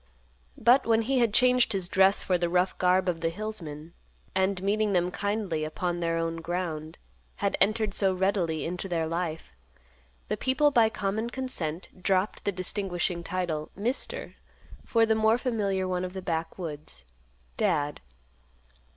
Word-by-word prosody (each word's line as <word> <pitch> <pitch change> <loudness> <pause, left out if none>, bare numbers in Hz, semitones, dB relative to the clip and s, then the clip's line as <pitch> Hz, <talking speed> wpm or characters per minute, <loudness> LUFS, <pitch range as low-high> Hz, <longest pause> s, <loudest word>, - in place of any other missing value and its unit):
But 250 +2 +4
when 225 0 +3
he 260 +3 +1
had 235 -3 +3
changed 250 +1 +4
his 190 -3 -1
dress 190 +2 +4
for 185 - +1
the 175 -1 0
rough 180 +1 +2
garb 185 +1 +3
of 170 -2 -1
the 165 - +1
hillsman, 165 -5 -6 0.4
and, 190 0 +1
meeting 210 +1 +1
them 180 0 +2
kindly 200 -6 -2
upon 175 +3 -2
their 165 -1 0
own 165 0 -1
ground, 165 -2 -4 0.4
had 200 -1 0
entered 215 -1 +2
so 195 -1 +2
readily 185 -4 0
into 180 +3 -4
their 165 -2 0
life, 165 - -3 0.7
the - - -1
people 265 +3 +2
by 230 -5 +5
common 220 +2 -2
consent 185 -10 -4
dropped 190 +2 0
the 200 - +2
distinguishing 180 -2 -1
title 170 -4 -2
"Mister" 235 +7 -4 0.5
for 230 -1 +3
the 220 - +3
more 220 +1 +3
familiar 205 -7 -1
one 180 -1 -1
of 180 0 -4
the 190 - -5
backwoods, 160 - -5 0.5
"Dad." 145 0 0
185 Hz, 150 wpm, -28 LUFS, 170-215 Hz, 0.7 s, by